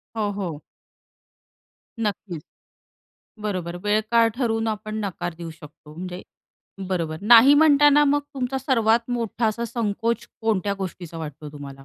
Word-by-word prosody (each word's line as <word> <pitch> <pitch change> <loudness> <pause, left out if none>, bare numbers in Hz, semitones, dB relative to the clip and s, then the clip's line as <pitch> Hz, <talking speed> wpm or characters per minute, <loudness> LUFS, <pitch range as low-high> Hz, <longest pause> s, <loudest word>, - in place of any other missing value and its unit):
हो, 210 -2 0
हो. 180 -7 -5 1.4
नक्कीच. 185 -6 -4 1.0
बरोबर 180 -5 -3
वेळ 210 +1 +3
काळ 230 -1 +5
ठरवून 225 -3 0
आपण 215 0 -4
नकार 175 -3 -4
देऊ 165 0 -7
शकतो 150 -1 -14
म्हणजे 180 +2 -6 0.7
बरोबर. 165 -4 -2
नाही 235 +6 +8
म्हणताना 295 -1 +6
मग 290 0 +3
तुमचा 265 0 -2
सर्वात 235 -3 +2
मोठा 235 -1 -1
असा 220 +2 -1
संकोच 230 0 -2
कोणत्या 205 -3 0
गोष्टीचा 175 -3 -6
वाटतो 150 -1 -7
तुम्हाला? 140 -2 -10
210 Hz, 125 wpm, -23 LUFS, 175-235 Hz, 1.4 s, नाही